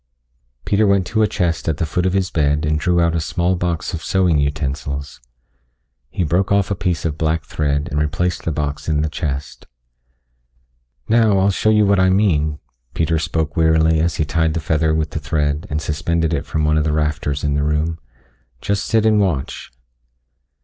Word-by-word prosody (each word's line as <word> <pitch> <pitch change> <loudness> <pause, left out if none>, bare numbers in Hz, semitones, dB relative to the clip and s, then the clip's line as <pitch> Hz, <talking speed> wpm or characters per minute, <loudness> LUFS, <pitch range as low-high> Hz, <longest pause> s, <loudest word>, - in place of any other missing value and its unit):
Peter 105 +1 +2
went 100 -2 +2
to 110 +3 0
a 110 - +4
chest 85 -4 -1
at 75 - -1
the 85 - -1
foot 90 +3 -1
of 90 - -1
his 95 -1 0
bed 75 0 +1
and 75 0 0
drew 90 +2 +1
out 85 -1 +2
a 80 - 0
small 90 +3 0
box 85 0 -2
of 85 - -5
sewing 90 -5 +2
utensils. 70 -1 -3 0.9
He 90 - -2
broke 90 +5 0
off 100 -1 +2
a - - +1
piece 85 -5 -2
of 80 -1 -2
black 80 0 0
thread 75 +1 -1
and 75 - 0
replaced 90 +4 -1
the 85 - -1
box 75 0 -3
in 75 -1 +1
the 80 - -1
chest. 70 -3 -5 1.4
"Now 110 -3 +3
I'll 95 +1 +3
show 110 - +1
you 105 -1 +4
what 100 -1 +3
I 95 0 +4
mean," 80 -7 +2 0.4
Peter 80 0 +1
spoke 80 -2 -2
wearily 80 0 +3
as 80 -1 0
he 80 - 0
tied 80 0 0
the - - 0
feather 80 0 +1
with 80 -1 -1
the - - -3
thread 75 +1 -1
and 75 - -1
suspended 80 +1 -1
it 70 -2 -2
from 80 0 -1
one 75 0 +2
of - - +1
the 75 0 0
rafters 75 -2 -1
in 75 -1 0
the 75 - 0
room. 75 +2 -1 0.6
"Just 100 +6 -1
sit 110 -1 +2
and 110 -1 +4
watch." 85 -10 -2
80 Hz, 200 wpm, -19 LUFS, 75-90 Hz, 1.4 s, a